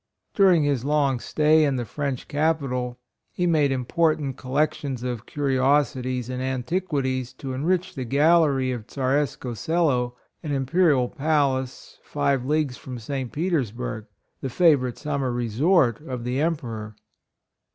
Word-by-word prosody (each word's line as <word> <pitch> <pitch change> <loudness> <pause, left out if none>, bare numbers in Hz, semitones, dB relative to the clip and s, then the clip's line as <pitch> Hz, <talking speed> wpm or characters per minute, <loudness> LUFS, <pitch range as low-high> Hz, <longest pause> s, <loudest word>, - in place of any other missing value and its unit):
— - - -52
During 185 -6 +5
his 140 -4 0
long 140 -3 +1
stay 155 +4 +3
in 140 -3 +1
the 120 -2 -2
French 130 +4 -4
capital, 140 -5 -1 0.3
he 180 - -1
made 155 -5 +3
important 140 +2 0
collec 145 +4 0
tions 130 -4 -5
of 120 -3 -4
curiosities 130 -3 +1
and 130 0 -4
antiquities 130 -1 -2
to 130 0 -6
enrich 175 +7 0
the 130 - -4
gallery 140 0 +3
of 120 -3 -5
Tzareskoe 135 -2 -1
Selo, 130 -5 0 0.3
an 150 -3 -3
imperial 140 -1 +2
palace 140 -3 -1
five 140 -3 0
leagues 145 -2 0
from 125 -2 -8
St. 130 +2 -4
Petersburgh, 125 - -2 0.3
the 135 - -3
favorite 130 -5 +3
summer 140 -4 -2
resort 120 - +2
of 125 -2 -4
the 125 +3 -1
Emperor. 115 -10 -3
135 Hz, 135 wpm, -24 LUFS, 125-150 Hz, 0.3 s, During